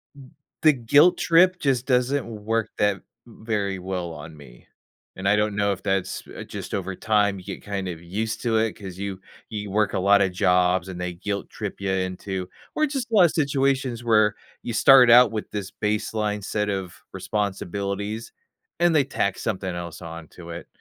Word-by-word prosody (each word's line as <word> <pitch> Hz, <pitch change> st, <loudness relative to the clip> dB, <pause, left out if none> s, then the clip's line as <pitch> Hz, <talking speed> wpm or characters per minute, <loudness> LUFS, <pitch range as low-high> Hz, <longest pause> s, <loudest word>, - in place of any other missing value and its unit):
M 135 Hz, -1 st, -14 dB, 0.3 s
the 155 Hz, -, +7 dB
guilt 145 Hz, +9 st, +4 dB
trip 180 Hz, +2 st, +4 dB
just 130 Hz, -5 st, +1 dB
doesn't 130 Hz, +1 st, +1 dB
work 110 Hz, 0 st, -2 dB
that 105 Hz, -1 st, +2 dB
v -, -, -19 dB, 0.2 s
very 105 Hz, -4 st, -3 dB
well 90 Hz, -2 st, -4 dB
on 80 Hz, +1 st, -10 dB
me. 60 Hz, -5 st, -16 dB, 0.5 s
And 95 Hz, +1 st, -3 dB
I 105 Hz, -, +5 dB
don't 105 Hz, -1 st, 0 dB
know 100 Hz, -1 st, +1 dB
if 95 Hz, -, -5 dB
that's, 95 Hz, -2 st, -1 dB
uh, -, -, -8 dB
just -, -, -8 dB
over 95 Hz, -1 st, -3 dB
time 105 Hz, -1 st, +1 dB
you 90 Hz, -, -14 dB
get -, -, -7 dB
kind 100 Hz, -2 st, -4 dB
of 85 Hz, -2 st, -6 dB
used 110 Hz, +6 st, -3 dB
to 115 Hz, -2 st, +2 dB
it, 110 Hz, -1 st, +1 dB
'cause 95 Hz, -4 st, -9 dB
you 100 Hz, -1 st, -5 dB, 0.3 s
you 105 Hz, -2 st, -5 dB
work 105 Hz, +1 st, +1 dB
a -, -, 0 dB
lotta 100 Hz, 0 st, +4 dB
jobs, 90 Hz, 0 st, +2 dB
and 90 Hz, -1 st, -7 dB
they 90 Hz, 0 st, -3 dB
guilt 100 Hz, +3 st, -4 dB
trip -, -, -6 dB
ya 95 Hz, -, -1 dB
into 95 Hz, 0 st, -3 dB, 0.3 s
or 310 Hz, -, +3 dB
just 270 Hz, -5 st, -4 dB
a -, -, -6 dB
lotta 180 Hz, -5 st, +7 dB
situations 135 Hz, -5 st, 0 dB
where 110 Hz, -2 st, +3 dB, 0.3 s
you 120 Hz, -, -5 dB
start 125 Hz, +1 st, +7 dB
out 120 Hz, -1 st, +8 dB
with 110 Hz, -1 st, -4 dB
this 100 Hz, -2 st, -5 dB
baseline 105 Hz, -1 st, -2 dB
set 105 Hz, 0 st, -1 dB
of 95 Hz, -3 st, -5 dB
responsibilities, 100 Hz, +1 st, -3 dB, 0.5 s
and 175 Hz, -1 st, +3 dB
they 145 Hz, -, +5 dB
tack 100 Hz, -7 st, -1 dB
something 95 Hz, -4 st, -3 dB
else 85 Hz, -1 st, -7 dB
onto 85 Hz, +1 st, -10 dB
it. 85 Hz, 0 st, -8 dB
105 Hz, 185 wpm, -24 LUFS, 95-115 Hz, 0.5 s, out